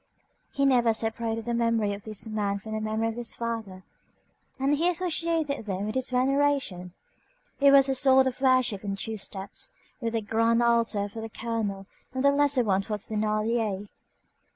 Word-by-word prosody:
He 275 - +1
never 240 -4 +4
separated 225 0 -2
the 240 - -2
memory 230 -3 +1
of 200 0 -8
this 215 0 -2
man 205 -2 -1
from 220 +2 -9
the 215 0 -2
memory 220 +1 -1
of 225 - -5
his 240 -1 -4
father, 225 -5 -5 0.8
and 275 +2 +2
he 330 +4 +2
associated 330 -6 -1
them 200 +1 -2
in - - -3
his 260 0 0
veneration. 255 -8 0 0.7
It 280 0 +6
was 275 -1 +7
a 270 - +1
sort 265 0 +5
of 260 0 -3
worship 255 -6 +2
in 200 -1 -2
two 220 +2 -4
steps, 195 - -5 0.3
with 230 -3 -3
the 225 -1 -1
grand 230 +2 +2
altar 230 -3 +2
for 220 +2 -8
the 225 - -6
colonel 215 -4 -3 0.3
and 260 - -1
the 280 - +6
lesser 285 -2 +3
one 195 -3 +2
for 210 +2 -3
Thénardier. 215 -1 -1
230 Hz, 175 wpm, -27 LUFS, 210-260 Hz, 0.8 s, was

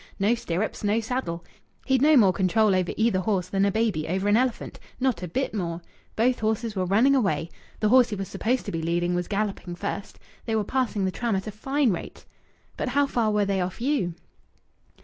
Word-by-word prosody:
No 205 +3 +2
stirrups, 215 -3 -3
no 210 +2 +2
saddle. 220 -8 -3 0.4
He'd 265 -2 +2
no 300 +1 +6
more 195 -6 +5
control 200 +3 +2
over 185 -2 +1
either 220 -4 +2
horse 185 -2 0
than 195 0 +1
a 200 - +2
baby 215 -8 0
over 190 +4 -1
an 205 - +4
elephant. 250 +1 -1 0.2
Not 255 -8 0
a 180 - -4
bit 260 +11 -2
more. 170 -5 -3 0.4
Both 245 +3 +2
horses 220 0 -1
were 185 -1 0
running 225 +9 +4
away. 195 -10 0 0.3
The 215 - +3
horse 250 0 +6
he 210 - -3
was 195 -1 -4
supposed 240 +6 -1
to - - -4
be 165 - -3
leading 175 +2 0
was 175 0 -1
galloping 200 -4 -3
first. 200 +2 -5 0.3
They 225 - 0
were 215 - +1
passing 220 -4 -1
the 190 - 0
tram 235 +1 -1
at 190 - -2
a 215 - -5
fine 270 +4 0
rate." 175 - -6 0.5
"But - - -2
how 285 +3 +3
far 235 -5 0
were 210 -1 +2
they 195 -1 0
off 180 +3 -4
you?" 240 - 0
210 Hz, 210 wpm, -25 LUFS, 185-240 Hz, 0.5 s, no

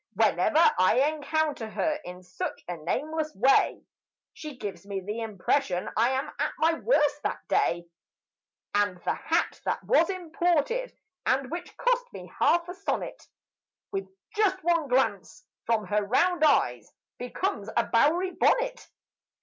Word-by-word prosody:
Whenever 325 +1 +4
I 185 +4 +4 0.2
encounter 300 -5 -1
her, 305 +6 -1
in 180 +1 -9
such 180 - -5
a 175 - -3
nameless 305 - -3
way 260 +7 +3 0.5
She 300 -4 -8
gives 195 -7 -6
me 200 -1 -4
the 210 +5 -4
impression 210 -2 -1
I 230 +3 +3
am 265 +1 -1
at - - 0
my 325 +1 +3
worst 300 - +2
that - - -4
day, 170 0 +1 0.9
And 205 -3 +1
the - - +1
hat - - -1
that - - -2
was 365 -9 +3
imported 355 - -1 0.3
(and 265 0 +1
that 345 - -6
cost - - 0
me - - -10
half 340 0 +3
a 355 - -5
sonnet) 385 +2 -4 0.6
With 390 -1 -3 0.3
just 410 -3 +2
one 335 -3 +2
glance 265 - 0 0.2
from 225 -2 +1
her 210 +3 0
round 320 - +2
eyes 125 - +2 0.3
becomes 245 - -3
a 235 - +4
Bowery 315 +11 +2
bonnet. - - +1
295 Hz, 140 wpm, -27 LUFS, 215-345 Hz, 0.9 s, Whenever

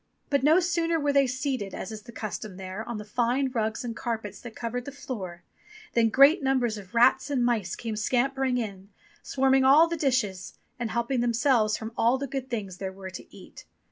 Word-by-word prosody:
But 280 - +3
no 310 +6 +5
sooner 335 -2 0
were 290 -1 +1
they 275 -1 +4
seated, 255 -6 -3
as 205 - -6
is 215 -1 -7
the 235 - -12
custom 215 -3 -6
there, 190 +2 -6
on 235 - -3
the 210 - -7
fine 245 +5 0
rugs 220 -2 -1
and 230 -1 -4
carpets 225 -5 -4
that 240 -2 -10
covered 245 +1 -4
the 280 - -6
floor, 200 - -7 0.5
than 230 -1 +3
great 275 - +6
numbers 260 -4 +1
of 195 +3 -13
rats 260 +4 +4
and 260 -4 +1
mice 215 -7 0
came 225 -2 -5
scampering 260 +3 0
in, 200 -4 -5 0.3
swarming 265 0 +2
over 265 - +6
all 315 +4 +7
the 335 - -2
dishes, 245 - -1 0.2
and 235 -2 -2
helping 235 +3 -1
themselves 235 -2 +2
from 220 0 -6
all 240 +3 +3
the 280 - -3
good 265 -1 -5
things 200 -6 -4
there 190 0 -4
were 190 0 -9
to - - -9
eat. - - -13
240 Hz, 205 wpm, -27 LUFS, 215-270 Hz, 0.5 s, all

